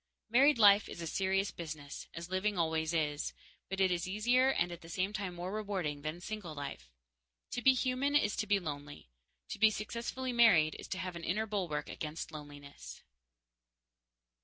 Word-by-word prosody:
Married 275 +4 +6
life 205 -2 +6
is 170 -1 -6
serious 195 +1 +1
business, 155 -4 -7
as 170 +1 -6
living 195 +2 0
always 160 -1 +1
is, 150 -3 -1 0.4
but 195 0 -3
it 190 -1 +4
is 175 0 -1
easier 240 +7 +3
and 175 -9 +1
at 175 0 -8
the 165 - -12
same 185 +4 -1
time 195 -4 -3
more 175 +2 -4
rewarding 195 -9 -2
than 155 +3 -4
single 180 -4 -6
life. 140 - -7 0.6
To 245 - -2
be 265 +1 +6
human 260 +3 0
is 210 -8 +3
to 215 - -1
be 200 0 +3
lonely. 145 - -7 0.4
To - - -5
be 220 +1 +7
successfully 235 +4 -4
married 185 -10 +5
is - - -8
to 190 - -3
have 185 -1 -4
an 170 - -7
inner 210 +7 0
bulwark 185 -8 -2
against 160 +2 -5
loneliness. 145 -2 -10
185 Hz, 175 wpm, -33 LUFS, 160-215 Hz, 0.6 s, be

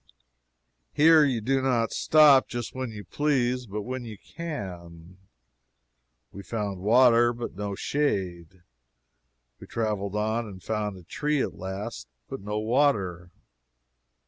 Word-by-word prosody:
Here 155 +1 +6
you 130 -6 0
do 135 +4 +1
not 120 -4 +1
stop 150 -4 +5
just 120 -2 -5
when 130 -1 -4
you 105 -2 -8
please, 125 -1 0
but 105 +1 -5
when 130 +2 -5
you 110 -3 -8
can. 90 - -8 1.1
We 100 - -9
found 100 -2 -4
water, 120 +3 +5
but 120 0 -6
no 100 0 -4
shade. 95 - -2 1.0
We - - -12
traveled 105 -3 -2
on 110 +2 -1
and 95 -3 -11
found 105 -3 -3
a 90 - -13
tree 150 - -1
at - - -4
last, 95 - -6 0.2
but - - -6
no 105 +1 -4
water. 105 - +1
110 Hz, 130 wpm, -26 LUFS, 95-130 Hz, 1.1 s, Here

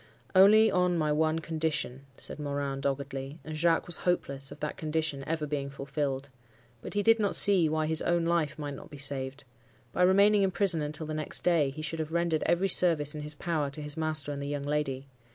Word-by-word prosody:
"'Only 215 +4 +6
on 180 -1 +1
my 155 -2 0
one 155 +1 +1
condition,' 155 -5 -3
said - - -4
Morin, 140 -1 -3
doggedly; 135 +1 -4
and 155 - -7
Jacques 165 +1 +2
was 175 - +3
hopeless 140 -6 -1
of - - -11
that 150 0 -4
condition 155 -3 -2
ever 160 -1 -2
being 140 -2 -3
fulfilled. 140 0 -4 0.5
But - - -8
he 205 - +1
did 225 +1 +4
not 205 -2 0
see 185 -6 +4
why 155 0 0
his 160 0 +2
own 170 -1 +1
life 165 -3 0
might 145 -2 -5
not - - -11
be 145 - -11
saved. 135 0 +2 0.5
By - - -1
remaining 200 +3 +5
in 195 - +3
prison 185 -3 +2
until 150 +2 -3
the 155 - -5
next 155 0 0
day, 165 -5 +3
he 155 +3 -8
should 160 +1 -3
have 160 0 -4
rendered 170 -2 0
every 175 +3 +2
service 165 -5 +3
in 150 - -6
his 150 0 -8
power 155 -2 -2
to 140 +2 -9
his 150 0 -6
master 155 -3 -1
and 140 -1 -5
the 140 - -4
young 145 -1 -3
lady. 140 -2 -2
155 Hz, 215 wpm, -29 LUFS, 140-170 Hz, 0.5 s, Only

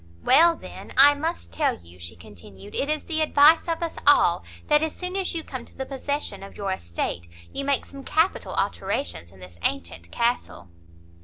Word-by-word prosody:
"Well, 335 +1 +6
then, - - -10
I 285 +2 +9
must 320 +4 -4
tell 300 -3 +1
you," 85 +1 -16
she 85 0 -6
continued, 95 +3 -13
"it 280 - -1
is 305 0 -1
the 315 -1 -1
advice 310 +2 +5
of 335 0 -1
us 335 - -4
all, - - +5 0.2
that 295 0 +4
as 315 -1 -2
soon 365 +1 -5
as 380 -2 -1
you 325 - -3
come 260 -5 -7
to - - -19
the 265 - -3
possession 285 0 -4
of 195 - -11
your 200 -1 -2
estate, 85 - -3 0.3
you 275 - -3
make 280 -1 +1
some 275 -1 -11
capital 325 +6 0
alterations 85 - -2
in 95 - -18
this 90 -2 -13
antient 85 -2 -2
castle." 235 - -1
275 Hz, 190 wpm, -25 LUFS, -, 0.3 s, I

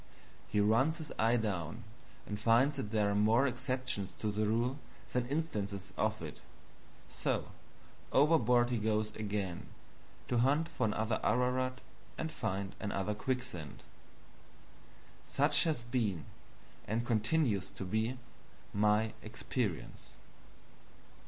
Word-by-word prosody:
He 105 - 0
runs 120 +10 +3
his 160 -3 -7
eye 115 +2 +4
down 95 -8 -2 0.4
and 105 -1 -4
finds 120 +6 +4
that 110 -6 -3
there 105 -2 +2
are - - 0
more 110 +6 +4
exceptions 125 -6 -1
to 105 - -1
the 105 +1 0
rule 120 +5 +1 0.3
than 125 -1 +1
instances 105 - -3
of - - 0
it. - - -7 0.7
So - - -1 0.6
overboard 125 -5 +4
he 120 - +1
goes 110 0 0
again, 100 -4 -3 0.6
to 120 - +1
hunt 145 +6 +3
for - - 0
another 110 +1 0
Ararat 130 +2 +1 0.4
and 160 - -3
find 95 -8 -2
another 100 -1 -1
quicksand. 105 - -4 1.4
Such - - +4
has 155 -7 0
been, 115 -8 -1 0.6
and 115 +2 -1
continues 115 - +1
to 95 - -7
be, 110 +6 0 0.6
my 105 +1 +3
experience. 110 -3 -4
110 Hz, 120 wpm, -34 LUFS, 105-130 Hz, 1.4 s, eye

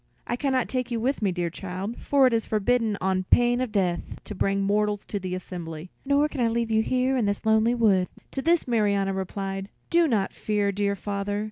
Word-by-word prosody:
I 240 - -1
can 275 +2 -1
not 255 -2 +1
take 255 -1 -2
you 235 -2 -1
with 260 +4 -1
me, 200 -3 +2
dear 175 -1 -2
child, 190 +5 -5
for 280 -2 +3
it 255 - +3
is 225 -1 0
forbidden 220 0 +1
on 185 0 0
pain 245 +4 +3
of 255 -3 -2
death 180 -4 -1
to - - -7
bring 195 0 0
mortals 205 +1 0
to 205 - -4
the 185 -1 -4
assembly, 175 -2 -7 0.2
nor 285 +1 +3
can 290 -4 -4
I 235 - +3
leave 230 0 -1
you 220 0 +4
here 255 +3 +1
in 245 -4 +1
this 205 +2 -2
lonely 220 +2 +3
wood." 200 -6 +3 0.2
To 270 - -3
this 335 +1 +2
Marianna 200 -4 +1
replied, 195 +1 -4 0.2
"Do 340 -1 +4
not 215 -8 0
fear, 205 -1 0
dear 200 0 0
father. 200 +1 -3
210 Hz, 220 wpm, -26 LUFS, 195-245 Hz, 0.2 s, you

